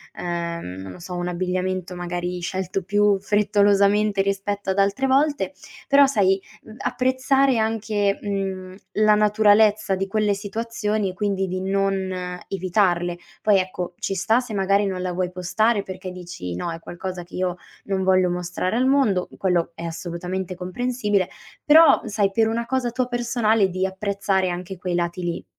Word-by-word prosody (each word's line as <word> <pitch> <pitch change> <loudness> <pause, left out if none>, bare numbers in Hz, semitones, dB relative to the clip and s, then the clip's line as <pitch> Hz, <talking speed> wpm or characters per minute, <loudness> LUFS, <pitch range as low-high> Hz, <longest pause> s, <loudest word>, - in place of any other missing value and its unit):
ehm, 170 - -4
non 95 0 -8
lo - - -12
so, 180 +1 -7
un 175 0 -2
abbigliamento 185 0 -2
magari 175 0 -3
scelto 185 +2 -2
più 205 +1 +2
frettolosamente 205 0 +3
rispetto 200 0 -2
ad 190 - -1
altre 200 +7 +2
volte, 285 +3 +2 0.3
però 280 -1 +6
sai, 195 -7 +2 0.2
mhmm, 220 - -13
apprezzare 260 +1 +2
anche, 215 -2 0
mhmm, 190 -2 -4 0.2
la 215 0 +4
naturalezza 210 0 +4 0.4
di 195 +1 -2
quelle 210 +1 +1
situazioni 210 0 -2
e - - -6
quindi 195 0 -1
di 185 +1 -3
non 195 -1 0 0.3
evitarle. 175 -2 0 0.3
Poi 210 -2 +5
ecco, 185 -1 -4
ci 195 - -2
sta, 205 +6 +2
se 245 -3 -6
magari 200 +1 +2
non 185 -1 -3
la 185 0 -2
vuoi 180 0 -1
postare 200 +4 +1
perché 185 -1 -7
dici: 175 - -7
"No, 170 - -3
è 165 - -6
qualcosa 175 +1 -6
che 170 - -13
io 180 -1 -1 0.3
non 195 -1 -1
voglio 185 -1 +3
mostrare 180 +3 -2
al 255 +1 +2
mondo", 240 -10 +2
quello 180 -3 +1
è 165 - -8
assolutamente 175 +2 -4
comprensibile. 205 +1 -1 0.4
Però 320 +2 +7
sai, 205 -2 0
per 220 +2 +2
una 230 +1 -1
cosa 255 0 -1
tua 255 +1 -1
personale 235 -4 +1
di 185 +1 -1
apprezzare 195 -1 -1
anche 180 +2 -5
quei 180 0 -3
lati 175 +1 -2
lì. 175 0 -3
195 Hz, 160 wpm, -23 LUFS, 180-215 Hz, 0.4 s, Però